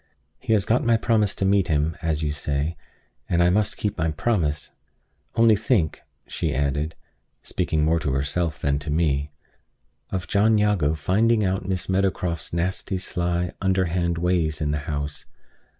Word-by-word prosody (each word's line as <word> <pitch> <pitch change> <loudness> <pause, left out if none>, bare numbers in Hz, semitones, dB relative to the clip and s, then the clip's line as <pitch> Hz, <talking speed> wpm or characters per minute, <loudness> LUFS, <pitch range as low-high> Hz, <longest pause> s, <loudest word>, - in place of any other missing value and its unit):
He 110 - 0
has 100 -2 +2
got 120 +4 +2
my 115 -1 +4
promise 110 -3 +1
to 95 - -1
meet 95 -1 +3
him, 80 +1 +1
as 80 -2 -1
you 75 - 0
say; 75 +2 -2 0.5
and 85 0 +3
I 90 - +4
must 105 +2 +1
keep 105 -5 -2
my 80 +1 +1
promise. 80 -4 -1 0.6
Only 115 -1 +6
think," 105 - 0 0.2
she - - -2
added, 70 +3 -1 0.5
speaking 75 -1 0
more 80 +1 +2
to 75 -3 -1
herself 75 +4 -1
than 70 0 0
to 75 - -6
me, 75 -2 +1 0.8
"of 90 -3 -3
John 105 +3 +3
Jago 100 -8 +2
finding 105 +7 +2
out 95 0 -1
Miss 95 -2 -2
Meadowcroft's 90 -3 -1
nasty, 95 +3 -2
sly, 90 -1 -1
underhand 90 -3 +1
ways 85 -3 +1
in 75 -2 0
the 75 - -1
house! 75 0 -4
85 Hz, 160 wpm, -24 LUFS, 75-95 Hz, 0.8 s, Only